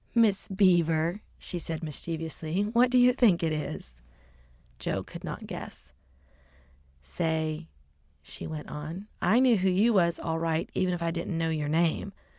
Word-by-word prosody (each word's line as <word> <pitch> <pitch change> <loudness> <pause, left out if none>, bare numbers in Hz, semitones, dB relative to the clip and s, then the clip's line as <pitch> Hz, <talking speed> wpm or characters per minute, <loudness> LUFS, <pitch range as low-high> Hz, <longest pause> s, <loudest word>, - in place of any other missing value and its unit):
"Miss 220 -4 +3
Beaver," 175 -2 +2 0.2
she 175 - -5
said 165 0 -4
mischievously. 160 +3 -3
"What 235 +4 +3
do 255 - +3
you 250 0 +6
think 210 -10 +4
it 160 - +1
is?" 140 - -5 0.9
Joe - - -2
could - - -10
not - - -6
guess. - - -9 1.1
"Say," 160 - -2 0.6
she - - -7
went 155 -2 -6
on, 160 +7 -6 0.2
"I 210 +7 +4
knew 255 -3 +5
who 190 0 +2
you 205 +6 +3
was 170 -4 +3
all 165 0 -2
right 165 0 0
even 180 -1 +1
if 170 - -4
I 165 - 0
didn't 170 +1 -3
know 165 0 0
yer 150 -2 -1
name. 165 +5 +1
170 Hz, 160 wpm, -28 LUFS, 160-195 Hz, 1.1 s, you